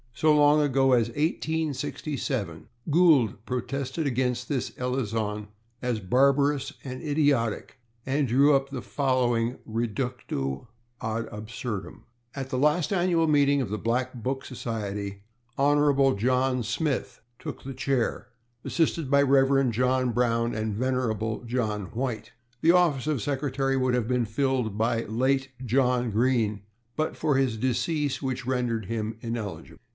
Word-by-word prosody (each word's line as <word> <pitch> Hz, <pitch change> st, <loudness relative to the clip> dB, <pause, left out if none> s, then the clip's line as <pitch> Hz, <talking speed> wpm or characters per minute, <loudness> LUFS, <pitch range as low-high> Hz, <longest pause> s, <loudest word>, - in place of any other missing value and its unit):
So 155 Hz, +4 st, +4 dB
long 150 Hz, 0 st, +5 dB
ago 135 Hz, -2 st, +3 dB
as 115 Hz, -2 st, +3 dB
1867, 145 Hz, -, -2 dB, 0.2 s
Gould 145 Hz, -, +4 dB
protested 130 Hz, +4 st, -3 dB
against 125 Hz, -2 st, -1 dB
this 135 Hz, -5 st, -1 dB
elision 110 Hz, -5 st, -2 dB, 0.3 s
as 125 Hz, -3 st, -1 dB
barbarous 140 Hz, +6 st, +2 dB
and 130 Hz, -1 st, -6 dB
idiotic, 145 Hz, -6 st, 0 dB, 0.3 s
and 135 Hz, +1 st, +1 dB
drew 140 Hz, +5 st, +5 dB
up 135 Hz, 0 st, 0 dB
the 135 Hz, -3 st, -5 dB
following 125 Hz, -3 st, 0 dB
/reductio 115 Hz, -, -3 dB, 0.3 s
ad 110 Hz, +1 st, -2 dB
absurdum/: 110 Hz, 0 st, -6 dB, 0.3 s
At 135 Hz, -1 st, -5 dB
last 150 Hz, +7 st, +2 dB
annual 175 Hz, -3 st, +2 dB
meeting 145 Hz, -2 st, +4 dB
of 105 Hz, -3 st, -4 dB
Black 125 Hz, +3 st, 0 dB
Book 130 Hz, +2 st, -3 dB
Society, 100 Hz, -5 st, -5 dB, 0.3 s
honorable 140 Hz, -2 st, +3 dB
John 125 Hz, +4 st, +1 dB
Smith 135 Hz, +5 st, -2 dB, 0.2 s
took -, -, -7 dB
the 135 Hz, -, -6 dB
chair, 130 Hz, -2 st, -1 dB, 0.4 s
assisted 165 Hz, -3 st, 0 dB
by 140 Hz, 0 st, +5 dB
reverend 135 Hz, -2 st, +3 dB
John 125 Hz, +1 st, +1 dB
Brown 115 Hz, -1 st, +1 dB
and 110 Hz, -1 st, -2 dB
venerable 115 Hz, -3 st, -1 dB
John 110 Hz, -4 st, -1 dB
White. 120 Hz, -2 st, -3 dB, 0.3 s
The 165 Hz, -, +6 dB
office 165 Hz, -7 st, +3 dB
of 150 Hz, -6 st, 0 dB
secretary 135 Hz, -1 st, -1 dB
would 130 Hz, -1 st, +2 dB
have 120 Hz, -3 st, 0 dB
been 125 Hz, -1 st, +1 dB
filled 120 Hz, -2 st, -1 dB
by 115 Hz, +1 st, +1 dB
late 130 Hz, +5 st, 0 dB, 0.2 s
John 125 Hz, 0 st, +2 dB
Green, 110 Hz, -2 st, +1 dB, 0.3 s
but 155 Hz, 0 st, -1 dB
for 155 Hz, -3 st, +1 dB
his 130 Hz, -4 st, +1 dB
decease, 140 Hz, +4 st, -1 dB
which 130 Hz, -2 st, -3 dB
rendered 120 Hz, -4 st, -1 dB
him 110 Hz, +1 st, -3 dB
ineligible. 115 Hz, -4 st, -5 dB
130 Hz, 130 wpm, -27 LUFS, 115-140 Hz, 0.4 s, The